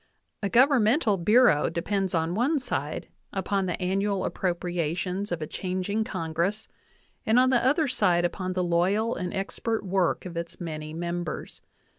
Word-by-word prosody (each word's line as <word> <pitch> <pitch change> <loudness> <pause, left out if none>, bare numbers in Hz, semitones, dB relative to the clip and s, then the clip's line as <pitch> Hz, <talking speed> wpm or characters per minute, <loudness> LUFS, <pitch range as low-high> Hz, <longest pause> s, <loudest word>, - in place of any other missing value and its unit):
A 200 - -1
governmental 245 -2 +4
bureau 210 -2 +4
depends 190 +1 -1
on 165 +1 0
one 255 - +2
side 260 - -3 0.2
upon 195 0 -1
the 180 - -2
annual 195 +1 0
appropriations 180 +2 -2
of 165 -2 -2
a - - -2
changing 185 +6 -2
Congress, 175 +4 -2 0.6
and 220 +2 +3
on 255 +1 +5
the 240 -2 +3
other 295 +4 +3
side 180 -9 +2
upon 185 +1 -2
the 180 0 0
loyal 190 +7 +1
and 180 0 -3
expert 210 +3 -2
work 190 -1 0
of 175 -2 -7
its 170 0 -5
many 155 -3 -5
mem 170 +2 -3
bers. 155 - -7
185 Hz, 155 wpm, -27 LUFS, 175-215 Hz, 0.6 s, on